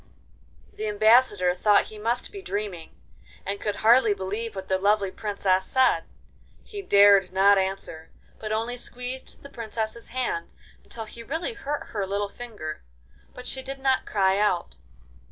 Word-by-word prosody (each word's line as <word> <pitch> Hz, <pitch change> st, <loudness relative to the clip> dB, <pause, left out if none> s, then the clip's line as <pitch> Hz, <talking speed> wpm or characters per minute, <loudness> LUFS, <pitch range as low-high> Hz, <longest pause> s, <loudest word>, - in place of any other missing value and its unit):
The 215 Hz, -, -4 dB
Ambassador 210 Hz, -3 st, +4 dB
thought 205 Hz, +3 st, +3 dB
he 215 Hz, -, -9 dB
must 235 Hz, +3 st, -1 dB
be 400 Hz, -, -8 dB
dreaming, 200 Hz, -, -5 dB, 0.5 s
and 200 Hz, +1 st, -3 dB
could 210 Hz, -1 st, -1 dB
hardly 230 Hz, -2 st, +6 dB
believe 205 Hz, +4 st, -4 dB
what 190 Hz, -1 st, -6 dB
the 190 Hz, 0 st, +1 dB
lovely 200 Hz, 0 st, +2 dB
Princess 195 Hz, -3 st, 0 dB
said. 255 Hz, -11 st, +3 dB, 0.6 s
He 410 Hz, -2 st, -7 dB
dared 200 Hz, -, +6 dB
not 195 Hz, +1 st, +5 dB
answer, 190 Hz, -4 st, -4 dB, 0.3 s
but 215 Hz, -1 st, -5 dB
only 230 Hz, +3 st, -1 dB
squeezed 250 Hz, +2 st, -6 dB
the 280 Hz, -, -10 dB
Princess's 225 Hz, -1 st, -5 dB
hand 255 Hz, -, -3 dB, 0.3 s
until 225 Hz, -1 st, -6 dB
he 230 Hz, +2 st, -10 dB
really 320 Hz, -, -3 dB
hurt 295 Hz, -8 st, -5 dB
her 200 Hz, -3 st, -3 dB
little 200 Hz, +1 st, -1 dB
finger, 205 Hz, -11 st, -7 dB, 0.5 s
but 250 Hz, -, -9 dB
she 265 Hz, -, -4 dB
did 270 Hz, +1 st, -6 dB
not 265 Hz, -1 st, +1 dB
cry 195 Hz, -1 st, +2 dB
out. 175 Hz, -, 0 dB
215 Hz, 155 wpm, -26 LUFS, 195-245 Hz, 0.6 s, hardly